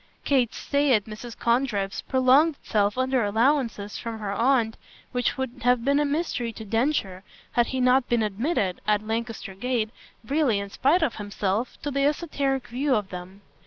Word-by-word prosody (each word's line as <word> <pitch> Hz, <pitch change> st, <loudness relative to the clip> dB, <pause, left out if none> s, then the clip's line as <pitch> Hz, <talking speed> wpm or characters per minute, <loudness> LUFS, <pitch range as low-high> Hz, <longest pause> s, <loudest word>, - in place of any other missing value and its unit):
Kate's 255 Hz, -5 st, +2 dB
stay 285 Hz, -1 st, +2 dB
at 210 Hz, -, +1 dB
Mrs. 220 Hz, +2 st, -9 dB
Condrip's 235 Hz, -5 st, 0 dB
prolonged 265 Hz, +5 st, +4 dB
itself 210 Hz, -4 st, 0 dB
under 260 Hz, -1 st, +1 dB
allowances 225 Hz, -1 st, +1 dB
from 230 Hz, -1 st, -5 dB
her 210 Hz, -2 st, -4 dB
aunt 230 Hz, 0 st, +2 dB, 0.4 s
which 245 Hz, +1 st, 0 dB
would 260 Hz, -1 st, -4 dB
have 245 Hz, 0 st, +2 dB
been 280 Hz, +1 st, +3 dB
a 295 Hz, -, +2 dB
mystery 285 Hz, -5 st, -1 dB
to 220 Hz, -, -9 dB
Densher 220 Hz, -5 st, 0 dB, 0.3 s
had 240 Hz, -1 st, +2 dB
he 260 Hz, -, -2 dB
not 255 Hz, 0 st, +3 dB
been 235 Hz, -2 st, +2 dB
admitted, 210 Hz, -, -1 dB
at 210 Hz, 0 st, +2 dB
Lancaster 225 Hz, -2 st, -4 dB
Gate, 220 Hz, +1 st, -1 dB, 0.3 s
really 275 Hz, -4 st, +2 dB
in 200 Hz, 0 st, -5 dB
spite 320 Hz, -, +2 dB
of 260 Hz, -, -1 dB
himself, 205 Hz, +2 st, -2 dB
to 290 Hz, -, -2 dB
the 275 Hz, 0 st, 0 dB
esoteric 280 Hz, -3 st, 0 dB
view 260 Hz, +3 st, 0 dB
of 205 Hz, -3 st, -1 dB
them. 185 Hz, +2 st, -8 dB
240 Hz, 170 wpm, -25 LUFS, 210-270 Hz, 0.4 s, prolonged